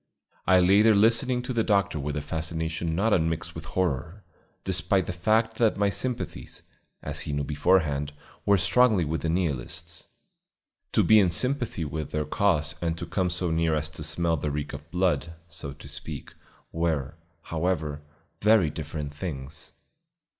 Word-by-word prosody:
I 95 -1 +6
lay 95 +3 +5
there 110 0 +5
listening 125 +4 +3
to 125 - -3
the 115 -2 +1
doctor 100 -6 +1
with 75 +1 -3
a 75 - -3
fascination 80 +1 -3
not 105 +5 +2
unmixed 80 -1 0
with - - -7
horror, 90 +2 -2 0.4
despite 95 -3 +1
the - - -4
fact 110 +5 +1
that 115 -3 +2
my 100 0 +2
sympathies, 125 +3 -3 0.4
as - - -4
he - - -4
knew 70 0 -1
beforehand, 75 -1 +1 0.3
were 100 0 +4
strongly 100 -1 +4
with 80 +2 -2
the 80 - -1
Nihilists. 85 +1 -3 0.9
To - - +4
be 110 0 +6
in 95 -3 +4
sympathy 120 - 0
with 75 +1 -4
their 75 0 -2
cause 85 -2 +1
and 85 -1 -1
to 85 - -5
come 90 +2 0
so 90 0 -1
near 80 -1 +2
as 75 0 -2
to 75 0 -10
smell 85 +1 0
the 75 +1 -2
reek 75 0 -4
of 75 +3 -9
blood, 90 -2 0 0.2
so 85 -5 -6
to 70 - -13
speak, - - -8 0.4
were, 80 -4 -1 0.3
however, 80 -3 -2 0.4
very 105 -7 +4
different 75 -1 -5
things. 75 -2 -7
85 Hz, 165 wpm, -27 LUFS, 75-100 Hz, 0.9 s, I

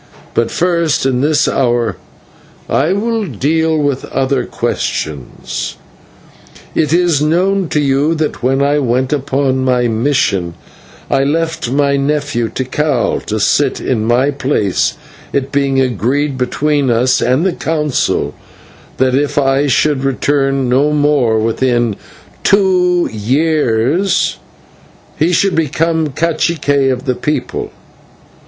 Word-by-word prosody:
But 115 0 +1
first 170 -6 0
in 130 -2 +1
this 150 0 +2
hour 120 -6 0 0.7
I 150 +6 +1
will 225 +3 -1
deal 160 - 0
with 145 -3 -1
other 135 0 -1
questions. 70 -5 -4 1.0
"It 150 -2 0
is 170 -3 +2
known 180 +4 +1
to 150 - 0
you 145 +3 +1
that, 155 -3 -2
when 135 +2 +1
I 145 +1 +2
went 130 +1 0
upon 135 -1 0
my 125 -2 +2
mission, 110 -8 0 0.6
I 135 - +3
left 160 -1 -1
my 140 +1 +1
nephew 140 -4 -1
Tikal 130 0 -1
to 110 +1 -1
sit 135 +6 +1
in 115 -5 -1
my 125 +5 +2
place, 135 -8 0 0.4
it 140 0 -1
being 140 -1 +1
agreed 130 +4 0
between 140 +2 0
us 120 +2 +2
and 130 +8 +1
the 190 - +1
Council 150 -5 -1 0.6
that 130 0 +2
if 145 +2 0
I 135 0 +2
should 140 0 +1
return 135 0 0
no 135 +4 +2
more 145 -6 +2
within 120 0 0 0.5
two 180 -3 +3
years 140 - +1 0.8
he 165 +3 +2
should 190 +2 +2
become 160 0 0
/cacique/ 145 -3 0
of 130 +2 -4
the 130 - +1
people. 150 +4 -3
140 Hz, 120 wpm, -15 LUFS, 125-155 Hz, 1.0 s, I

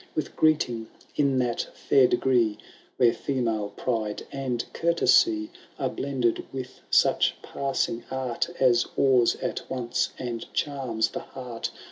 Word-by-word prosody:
With 155 - -3
greeting 125 -8 +2 0.3
in 140 -2 +2
that 120 -2 0 0.2
&ir 135 -2 +7
degree. 120 -6 +2 0.4
Where 120 -2 +5
female 115 -6 -1
pride 110 -1 -2
and 130 -3 -2
courtesy 315 - +3 0.3
Are - - -1
blended 130 -4 -1
with 130 -1 -7
such - - +4
passing 135 -4 -2
art 130 0 -2
As 120 -2 +4
awes 130 -3 +4
at - - -2
once 125 -2 -1
and 120 -2 -5
charms 125 -6 0
the - - -5
heart. 125 -3 -6
125 Hz, 125 wpm, -26 LUFS, 115-135 Hz, 0.4 s, ir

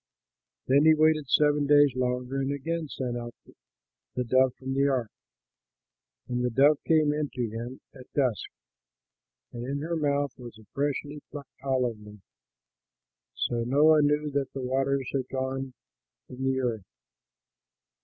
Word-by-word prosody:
Then 140 +3 +4
he 160 0 +7
waited 155 -2 +3
seven 145 -1 +3
days 145 -2 +5
longer 125 +1 -1
and 135 +1 -1
again 160 +3 -3
sent 125 -3 -4
out 120 0 -6 0.8
the 125 - 0
dove 130 +1 +3
from 130 0 -5
the 140 +1 +2
ark. 125 -6 -1 1.2
And 125 0 -2
the 125 - +1
dove 140 +5 +4
came 155 -2 +4
in 150 -1 -2
to 120 -2 -2
him 120 +4 -7
at 130 -3 -14
dusk; 130 -8 0 1.0
and 120 - -6
in 135 +3 -3
her 165 +2 -2
mouth 145 -3 0
was 120 -3 -10
a 110 - -17
freshly 145 +1 -2
plucked 145 -2 -9
olive 125 -5 0
leaf. 105 0 -13 1.2
So 120 -1 -1
Noah 150 +5 +5
knew 150 0 +1
that 140 -1 -1
the 135 - -5
waters 135 +1 0
had 130 -2 -2
gone 130 0 -3 0.5
from 130 +1 -6
the 130 0 +1
earth. 115 -6 -2
135 Hz, 150 wpm, -27 LUFS, 125-145 Hz, 1.2 s, he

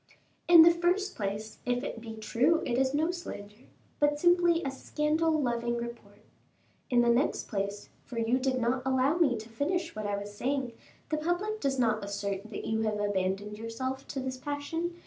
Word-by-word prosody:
"In 340 -2 +10
the 340 - +8
first 355 +4 0
place, 210 +1 -4
if 245 +1 0
it 230 - -5
be 225 -1 -7
true, 245 +9 +2
it 240 - 0
is 260 +1 +2
no 310 +4 +1
slander, 215 - -9 0.3
but 295 0 +3
simply 345 0 +4
a 275 - -2
scandal 310 +3 0
loving 240 -3 0
report. 235 0 -8 0.7
In 245 -1 +4
the 240 - +3
next 240 +5 +1
place 200 -1 -3
for 240 - -9
you 230 +3 +2
did 260 0 0
not 245 +2 +1
allow 265 +4 +2
me 275 -9 +3
to 215 +1 -8
finish 330 +9 -2
what 215 -1 -3
I 200 0 -1
was 205 0 -7
saying 265 +2 -1 0.4
the 310 - 0
public 350 +7 -1
does 270 -1 0
not 220 -4 +1
assert 200 0 -4
that 210 - -6
you 220 0 0
have 215 -1 0
abandoned 205 +1 -1
yourself 260 +4 -4
to 275 - -4
this 260 0 -4
passion. 295 +5 -3
255 Hz, 185 wpm, -30 LUFS, 220-305 Hz, 0.7 s, In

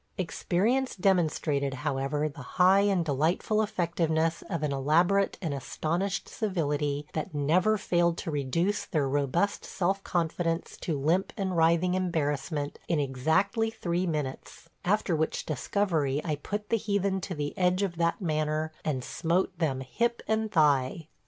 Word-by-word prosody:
Experience 210 +8 0
demonstrated, 155 -7 +1
however, 135 +3 -1
the 145 -1 -8 0.2
high 185 +2 +6
and 195 -4 +2
delightful 160 +9 +1
effectiveness 165 -5 0
of 170 -4 -2
an 150 - 0
elaborate 170 +8 +2
and 160 -4 -1
astonished 170 +8 -2
civility, 150 -8 -1
that 155 -1 -4
never 175 +9 +3
failed 175 -3 +1
to 165 - -4
reduce 155 +8 0
their 150 -5 0
robust 145 +8 0
self 195 +1 -1
confidence 165 -1 -1
to 155 -5 -3
limp 165 +7 +1
and 190 -3 -1
writhing 170 +2 +3
embarrassment 150 -5 -1
in 165 - +1
exactly 160 - +1
three 180 -5 -2
minutes, 150 -5 -4
after 195 -2 +1
which 160 0 -1
discovery 155 -4 0
I 155 -3 -1
put 205 +7 -5
the 230 - +3
heathen 200 -2 0
to 180 - -4
the 145 -1 -3
edge 180 +1 +2
of 175 -4 -2
that 170 0 +1
manner 155 -2 -1
and 135 -5 -1
smote 170 +8 0
them 135 -6 0
hip 235 - -1
and 220 0 0
thigh. 150 -2 +2
165 Hz, 145 wpm, -28 LUFS, 150-190 Hz, 0.2 s, high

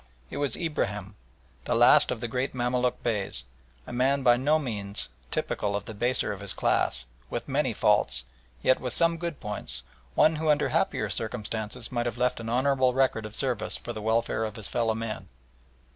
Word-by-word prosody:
It - - -5
was 145 -1 0
Ibrahim, 105 - -2 0.5
the - - +1
last - - +6
of - - -2
the 120 - -1
great 125 +3 -2
Mamaluk 125 0 0
Beys, 105 - -1 0.4
a - - -8
man 135 +3 +2
by 120 -1 +6
no 145 +5 +3
means 100 - -2 0.2
typical 100 -1 -1
of 100 0 -3
the 110 - -7
baser 120 +4 +1
of - - -8
his - - -4
class, - - +1 0.2
with - - -4
many - - +1
faults, 60 -1 +2 0.4
yet 130 - +4
with 125 -2 -3
some 165 +3 +3
good 170 -2 -4
points, 105 0 -3 0.3
one 155 0 +5
who 155 0 0
under 150 - +3
happier - - 0
circumstances 110 +1 -3
might 120 -1 0
have 120 0 -3
left 125 0 +1
an 115 0 -5
honourable 130 +1 +2
record 130 -5 +2
of 105 - -11
service 125 -5 -1
for - - -6
the 110 - -6
welfare 110 +1 +1
of 110 -1 -3
his 110 -3 -2
fellow 115 -2 0
men. 115 -1 -4
120 Hz, 190 wpm, -28 LUFS, 110-130 Hz, 0.5 s, last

